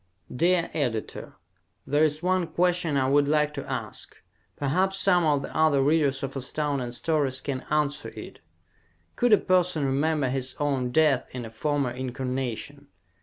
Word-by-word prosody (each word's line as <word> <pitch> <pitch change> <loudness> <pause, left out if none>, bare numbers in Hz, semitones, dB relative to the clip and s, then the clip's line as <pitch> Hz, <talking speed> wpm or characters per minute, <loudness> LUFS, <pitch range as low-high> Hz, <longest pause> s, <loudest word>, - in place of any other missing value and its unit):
_ - - -8
Dear 170 +4 +2
Editor: 120 -8 -3 0.5
There 145 +2 +1
is 155 +1 +1
one 185 -1 +1
question 175 -2 +1
I 130 -1 +2
would 145 +1 +3
like 150 0 +2
to 140 -2 -6
ask. - - -5 0.4
Perhaps 185 +7 0
some 180 -3 +4
of 145 -3 +2
the - - -8
other 155 -4 +3
readers 140 -2 +2
of 135 0 -4
Astounding 135 -1 -2
Stories 135 +1 0
can 135 -2 -4
answer 150 -1 0
it. - - -10 0.8
Could 245 -1 +2
a 210 - +8
person 180 -6 +1
remember 145 +1 +1
his 130 0 -2
own 135 -4 0
death 150 -1 +2
in 125 -2 -5
a 110 - -9
former 140 +2 -1
incarnation? 130 +2 -4
145 Hz, 160 wpm, -26 LUFS, 135-160 Hz, 0.8 s, a